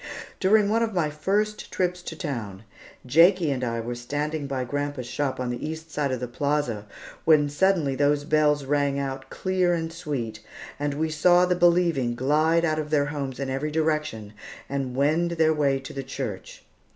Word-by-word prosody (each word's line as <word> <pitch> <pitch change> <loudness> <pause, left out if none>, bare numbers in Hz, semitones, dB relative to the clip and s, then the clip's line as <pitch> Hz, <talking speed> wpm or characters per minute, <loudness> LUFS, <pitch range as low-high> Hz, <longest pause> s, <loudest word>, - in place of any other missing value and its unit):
During 205 +2 +4
one 225 +2 +2
of 225 -3 -1
my 155 -4 +1
first 205 +7 -1
trips 180 -1 -1
to 170 - -7
town, 115 - -5 0.4
Jakie 165 +4 +5
and 130 -2 -2
I 115 -1 -1
were 120 +2 -4
standing 145 +5 -3
by 135 -2 -2
grandpa's 145 0 -3
shop 135 +1 -2
on 125 -1 -2
the 120 - -5
east 160 +1 -6
side 145 -2 -1
of 130 - -2
the 125 - -4
plaza, 125 -5 -1 0.4
when 150 -2 +4
suddenly 165 -2 +2
those 145 +1 +2
bells 150 -2 +2
rang 140 0 +1
out 135 -1 -4
clear 185 -2 +1
and 165 -1 -4
sweet, 135 -10 -4 0.4
and 145 -1 -1
we 160 +1 -1
saw 175 +3 +5
the 180 - +2
believing 170 -8 +3
glide 155 +6 +2
out 155 -1 0
of 150 -1 -4
their 145 -2 +2
homes 135 -3 -4
in 135 -1 -2
every 135 +3 -2
direction 150 -9 -1 0.3
and 135 -2 -3
wend 155 +5 +2
their 160 -1 +3
way 140 -3 +2
to 135 - -9
the 135 - -4
church. 135 - -6
150 Hz, 185 wpm, -25 LUFS, 135-165 Hz, 0.4 s, Jakie